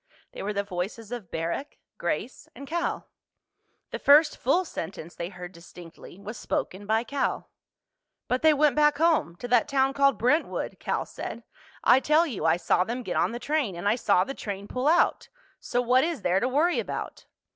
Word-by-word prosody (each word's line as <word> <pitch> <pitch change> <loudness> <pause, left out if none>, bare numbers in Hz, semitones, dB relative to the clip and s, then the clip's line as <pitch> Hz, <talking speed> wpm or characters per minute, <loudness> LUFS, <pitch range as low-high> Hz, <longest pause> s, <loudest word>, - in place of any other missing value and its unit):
They - - -8
were 205 - -2
the 200 -1 -1
voices 200 +4 -5
of 235 -8 -6
Barrack, 170 - -4 0.2
Grace, - - -3
and 280 - -9
Cal. 340 +4 -2 0.8
The - - -4
first 295 +2 +6
full 335 +9 +1
sentence 170 - -7
they 170 0 -5
heard 180 -1 -9
distinctly 170 0 -13
was 210 +3 -8
spoken 200 +2 -3
by 220 +1 +2
Cal. 280 +3 -2 0.8
"But 250 - 0
they 315 - +6
went 295 -2 +3
back 295 -1 +4
home—to 290 - +1
that 245 -2 +4
town 270 0 +2
called 275 -4 +3
Brentwood," 255 +9 0
Cal - - -2
said. - - -7 0.4
"I - - +6
tell 305 +4 +3
you 260 - -4
I 165 +1 +4
saw 175 0 +2
them 240 +5 -4
get - - -4
on - - +2
the 235 - -4
train, 280 - -1
and 175 +4 -4
I 205 - +4
saw 200 -6 +3
the 270 - -5
train 200 -5 -6
pull 255 +5 -2
out. 340 +3 +2 0.3
So 245 0 -1
what 250 +2 +4
is 320 - -2
there 180 +2 +2
to 245 - 0
worry 310 +7 +2
about?" - - -5
245 Hz, 190 wpm, -26 LUFS, 190-285 Hz, 0.8 s, first